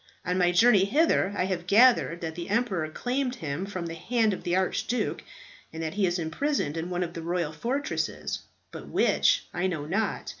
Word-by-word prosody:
On 180 - 0
my 175 -1 +4
journey 200 +1 +5
hither 275 - +2
I 180 - +1
have 180 -2 -3
gathered 210 -5 +5
that 160 -1 -4
the 170 +3 -7
emperor 200 -8 0
claimed 250 - -2
him 160 - -4
from 185 -4 -5
the 165 - -5
hand 220 +5 +1
of - - -5
the 175 - -1
Archduke, 190 +6 -1 0.5
and 160 0 -6
that 160 0 -3
he 200 -2 +1
is 175 +1 0
imprisoned 165 - -1
in 165 +2 -3
one 180 0 -1
of 170 -1 -5
the 165 - -6
royal 170 -2 -1
fortresses; 265 - -2 0.3
but - - -9
which, - - +2
I 180 +1 0
know 160 -6 -3
not. 195 +8 -2
180 Hz, 195 wpm, -27 LUFS, 170-225 Hz, 0.5 s, journey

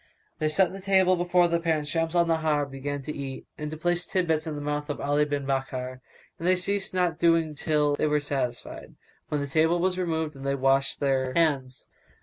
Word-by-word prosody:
They 155 - +1
set 185 +4 +2
the 195 +1 -8
table 190 -1 +4
before 175 0 +3
the 170 0 +1
pair 165 -1 +1
and 150 -1 -5
Shams 165 +2 -1
al 170 -1 +4
Nahar 160 -3 +1
began 140 +1 -5
to 150 +2 -5
eat[FN#181] 135 -2 -6
and 150 0 -4
to 155 - -6
place 175 +2 0
tid 185 -1 0
bits 160 -1 0
in 155 - -3
the - - -4
mouth 150 +1 -3
of 145 - -3
Ali 145 +1 +2
bin 145 -1 -3
Bakkar; 130 -1 -3 0.4
and 170 - -2
they 185 - +5
ceased 195 +2 -1
not 175 -3 +1
so 170 - +3
doing 165 -2 +3
till 150 0 +1
they 155 - +1
were 150 0 +2
satisfied, 135 -4 -4 0.3
when 150 -1 -1
the - - -1
table 160 +4 +2
was 185 +1 0
removed 160 -4 -1
and 135 - -10
they 140 0 0
washed 135 0 +2
their 130 -2 0
hands. 140 -6 0
155 Hz, 225 wpm, -26 LUFS, 140-170 Hz, 0.4 s, they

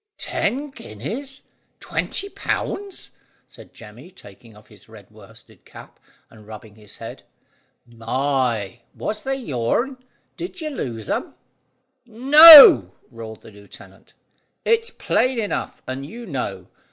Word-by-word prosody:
"Ten 280 +3 -3
guineas! 255 - -9 0.4
Twenty 395 - -4
pounds!" 400 0 -5 0.3
said - - -17
Jemmy, 120 +9 -14
taking 115 - -18
off 105 - -20
his 105 +1 -20
red 105 -3 -17
worsted 110 0 -19
cap, - - -16 0.3
and 105 -2 -19
rubbing 110 -1 -12
his 105 -1 -16
head. - - -10 0.6
"My! 120 -2 -3 0.2
Was 215 0 -5
they 270 0 -3
your'n? 235 - -3 0.4
Did 365 +1 -8
you 310 -2 -5
lose 115 - -7
'em?" - - -4 0.7
"No," 275 - +9 0.2
roared 110 -2 -11
the - - -15
lieutenant; 100 0 -17 0.5
"it's 460 0 +1
plain 255 - -1
enough, 210 -3 -5
and 130 +1 -6
you 230 +12 -10
know. 100 - -6
125 Hz, 120 wpm, -20 LUFS, -, 0.7 s, No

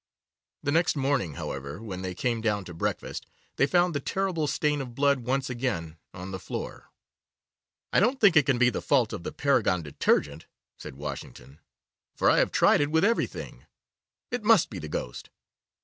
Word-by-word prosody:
The 145 - 0
next 165 +2 +2
morning, 135 - 0
however, 70 +4 -6
when 100 -5 -6
they 95 -1 -4
came 120 +1 -1
down 105 -3 0
to 90 - -9
breakfast, 80 - -4 0.3
they 135 - +4
found 175 +2 +3
the 145 - -1
terrible 180 0 -1
stain 150 0 0
of 125 -3 -8
blood 140 0 +3
once 130 +2 -1
again 120 -11 -3 0.2
on 90 +1 -8
the 95 - -5
floor. - - -7 1.0
'I - - +5
don't 250 +7 +2
think 200 -5 +5
it 150 -3 +5
can 135 -3 +3
be 125 0 +4
the - - -3
fault 125 -6 +2
of - - -5
the - - -5
Paragon 110 - +1
Detergent,' 75 -1 0 0.3
said - - -10
Washington, 70 -1 -8 0.6
'for - - +4
I - - +4
have - - +2
tried - - +4
it 145 - +1
with 160 +4 +3
everything. 230 +2 -2 0.6
It 245 -3 -3
must 215 - +4
be 95 - -6
the 80 - -7
ghost. 60 -4 -5
125 Hz, 180 wpm, -27 LUFS, 90-150 Hz, 1.0 s, I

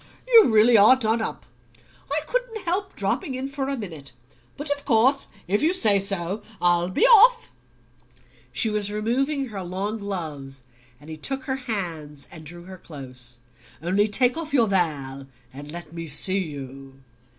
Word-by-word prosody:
You 460 - +7
really 220 +1 +5
are 215 +6 +7
done 225 -2 0
up. - - -5 0.7
I 300 +2 +1
couldn't - - -3
help 380 +2 -2
dropping 235 +7 -2
in 260 +1 -4
for 275 -1 -4
a 275 - -2
minute; 160 - -8 0.4
but 290 0 -3
of 285 0 -2
course 260 +3 +3 0.2
if 200 +3 0
you 325 +4 +2
say 210 - +4
so 195 +1 -2 0.2
I'll 175 0 +2
be 185 - +2
off." 475 0 +6 1.0
She 220 - +2
was 205 -1 -1
removing 265 +6 -1
her 200 -3 -6
long 195 +5 -4
gloves 150 -10 -7 0.4
and 150 - -17
he 155 - -7
took 270 - -1
her 265 0 -3
hands 160 -9 -3
and 155 -1 -11
drew 175 +2 -11
her 185 0 -11
close. 125 -6 -7 0.4
"Only 190 +6 +1
take 250 +6 +4
off 315 -3 -4
your 240 -4 +4
veil, 145 -9 -2 0.3
and 145 +2 -9
let 170 -1 -9
me 165 -1 -7
see 185 +7 0
you." 135 -5 -8
200 Hz, 165 wpm, -24 LUFS, 160-265 Hz, 1.0 s, You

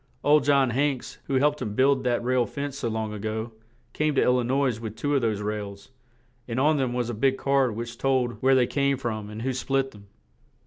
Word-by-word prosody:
Old 150 0 +5
John 140 -3 +3
Hanks, 135 +1 -1
who 140 - -4
had 130 - +3
helped 150 0 +2
him 105 -1 -4
build 135 +1 +3
that 120 -1 +1
rail 125 -1 +1
fence 140 -1 -5
so 120 - -2
long 110 -1 -3
a 105 - -6
go, 110 +2 -3 0.4
came 155 -1 0
to - - +4
Il 125 0 +3
li 125 - 0
nois 130 -2 +1
with 110 -2 -6
two 145 +6 -1
of 140 - +2
those 110 -3 0
rails; 105 0 -5 0.6
and 120 +1 -2
on 150 +3 +3
them 130 -3 0
was 120 -1 -1
a - - -5
big 135 +4 +1
card 135 -5 +1
which 115 +1 -6
told 130 -3 0
where 135 +1 +4
they 125 -1 +4
came 140 +1 0
from, 110 -5 -4
and 110 +2 -7
who 130 0 -1
split 135 +1 -1
them. 100 -1 -16
125 Hz, 235 wpm, -26 LUFS, 110-135 Hz, 0.6 s, Old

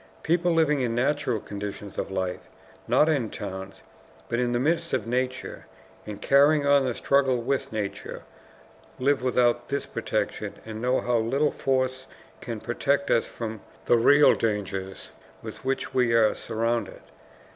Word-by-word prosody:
People 175 +2 +2
living 155 -4 +2
in 120 -2 -1
natural 130 -2 0
conditions 100 0 -7
of - - -3
life, 95 -1 -4 0.4
not 130 +6 +4
in 140 -8 +1
towns, 95 -2 -7 0.5
but 120 - 0
in 120 -1 +1
the 120 - +1
midst 165 +5 0
of 130 -4 0
nature, 130 +2 -3 0.4
and 105 -1 -6
carrying 145 +2 +4
on 140 -1 +4
the 125 -2 -1
struggle 135 -2 +2
with 135 +3 -2
nature, 100 -3 -5 0.7
live 140 +1 +1
without 125 -1 +1
this 140 0 -2
protection - - -3
and 110 0 -7
know 125 +1 +1
how 120 -1 +1
little 135 +7 +1
force 130 -1 -1 0.3
can 115 -3 -5
protect 140 +5 0
us 115 - +2
from 110 -3 -6 0.2
the - - +4
real 145 +5 +6
dangers 95 -3 -3 0.3
with - - -9
which 135 0 -2
we 125 -2 +2
are 110 -2 +4
surrounded. 115 +1 -2
125 Hz, 150 wpm, -26 LUFS, 110-140 Hz, 0.7 s, real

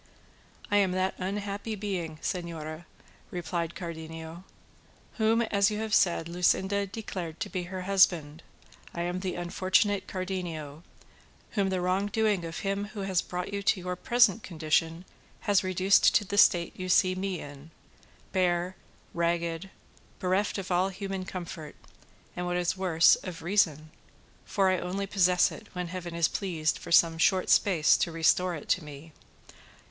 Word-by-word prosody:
"I 205 - +4
am 195 -3 +3
that 185 +1 0
unhappy 200 +3 -3
being, 185 -6 -4
señora," 165 -2 -4 0.4
replied 170 -1 -3
Cardenio, 165 0 -7 0.7
"whom, 225 +1 +3
as 200 -3 +2
you 210 - -3
have 220 0 -3
said, 170 -4 +3
Luscinda 190 +3 +1
declared 185 -6 -6
to - - -3
be 180 -2 -3
her 185 +1 -6
husband; 175 -5 +2 0.5
I 170 - -2
am 175 +1 -2
the 185 -1 -3
unfortunate 190 +3 +1
Cardenio, 175 -6 -5 0.7
whom 200 -2 0
the 185 -1 -1
wrong 185 +3 +1
doing 210 -3 +1
of 165 -1 -6
him 200 +1 -1
who 205 0 -7
has 190 -2 +1
brought 180 +2 -5
you 200 - -2
to 195 - +2
your 180 0 -4
present 235 +1 +3
condition 165 0 -1 0.4
has 200 -2 +2
reduced 185 +1 +4
to 210 - +3
the 200 - -4
state 170 -4 +4
you 185 0 -5
see 185 +1 +4
me 185 -1 -3
in, 145 +2 -10 0.6
bare, 180 -1 0 0.4
ragged, 170 +1 -1 0.5
bereft 190 +3 0
of 190 -1 -5
all 180 +2 +2
human 195 -1 -5
comfort, 175 -4 -7 0.6
and 180 0 -3
what 175 0 0
is 175 +1 0
worse, 175 -4 +4
of 175 -4 -8
reason, 160 -5 +1 0.5
for 195 -2 +2
I 185 - +1
only 190 +3 -3
possess 180 -2 +3
it - - -10
when 180 -1 -4
Heaven 175 -1 -6
is 170 -2 +3
pleased 165 -6 -1
for - - -9
some 165 -1 +5
short 185 +2 +3
space 170 -7 +4
to 170 - -1
restore 170 +2 +2
it 150 - -9
to 185 - +2
me. 150 +2 -11
180 Hz, 155 wpm, -28 LUFS, 170-195 Hz, 0.7 s, some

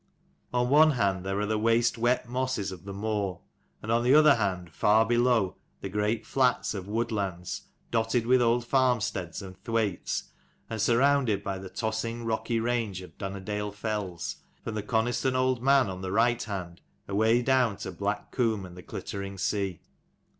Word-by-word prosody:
On 125 0 +1
one 155 +1 +7
hand 100 -6 0
there 95 +1 -2
are 105 - 0
the 110 0 0
waste 115 +2 +3
wet 120 +1 +1
mossss 125 -5 -2
of 95 0 -10
the 100 - -6
moor, 100 -2 -2 0.4
and 110 - -3
on 115 +1 +3
the 130 +4 +5
other 150 -1 +8
hand, 95 -7 -2
far 110 +2 +4
below, 120 -4 +2 0.2
the 95 - -4
great 105 +3 -1
flats 125 -2 +1
of 95 -2 -6
Woodlands, 100 -5 -3 0.2
dotted 115 +1 +1
with 125 +1 +4
old 120 0 +2
farmsteads 120 - 0
and 95 0 -11
thwaites, 110 -5 -1 0.4
and 110 -2 -2
surrounded 120 -2 +3
by 95 -1 -3
the 95 0 -8
tossing 110 +3 -3
rocky 115 +1 -1
range 115 -5 -1
of 90 - -13
Dunnerdale 100 +1 -4
fells, 100 -5 -3 0.3
from 115 - -4
the 105 - -2
Coniston 120 +4 0
Old 130 -1 +1
Man 135 -2 +4
on 95 -1 -5
the 95 -1 -4
right 120 +3 +3
hand 90 -5 -5 0.3
away 110 +4 +3
down 125 -5 +2
to - - -5
Black 100 +4 -3
Comb 110 -6 0
and 90 -1 -11
the 90 - -9
glittering 100 +2 -6
sea. 95 -2 -1
110 Hz, 170 wpm, -28 LUFS, 100-120 Hz, 0.4 s, other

